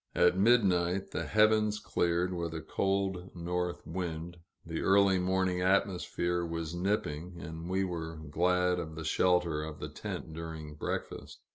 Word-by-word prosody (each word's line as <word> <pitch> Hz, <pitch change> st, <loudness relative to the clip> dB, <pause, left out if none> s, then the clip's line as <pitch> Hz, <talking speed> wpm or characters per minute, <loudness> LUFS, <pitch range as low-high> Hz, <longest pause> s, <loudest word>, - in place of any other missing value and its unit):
At -, -, +5 dB
midnight, 95 Hz, -4 st, +3 dB
the -, -, -3 dB
heavens 110 Hz, 0 st, +4 dB
cleared, 85 Hz, +1 st, 0 dB
with 85 Hz, -2 st, -3 dB
a 80 Hz, -, -4 dB
cold 95 Hz, +2 st, -1 dB
north 90 Hz, +1 st, -2 dB
wind; 85 Hz, 0 st, -4 dB, 0.3 s
the 80 Hz, -1 st, -3 dB
early 95 Hz, -1 st, +4 dB
morning 95 Hz, 0 st, +1 dB
atmosphere 90 Hz, -2 st, +1 dB
was 85 Hz, -1 st, -3 dB
nipping, 85 Hz, -2 st, -2 dB
and 80 Hz, +2 st, -7 dB
we 95 Hz, +1 st, +1 dB
were 80 Hz, -3 st, -4 dB
glad 90 Hz, +4 st, +1 dB
of 80 Hz, -2 st, -5 dB
the 80 Hz, -, -5 dB
shelter 90 Hz, -4 st, +2 dB
of 80 Hz, -1 st, -6 dB
the -, -, -5 dB
tent 80 Hz, -, -6 dB
during 80 Hz, -2 st, -6 dB
breakfast. 75 Hz, -, -5 dB
90 Hz, 145 wpm, -31 LUFS, 80-95 Hz, 0.3 s, At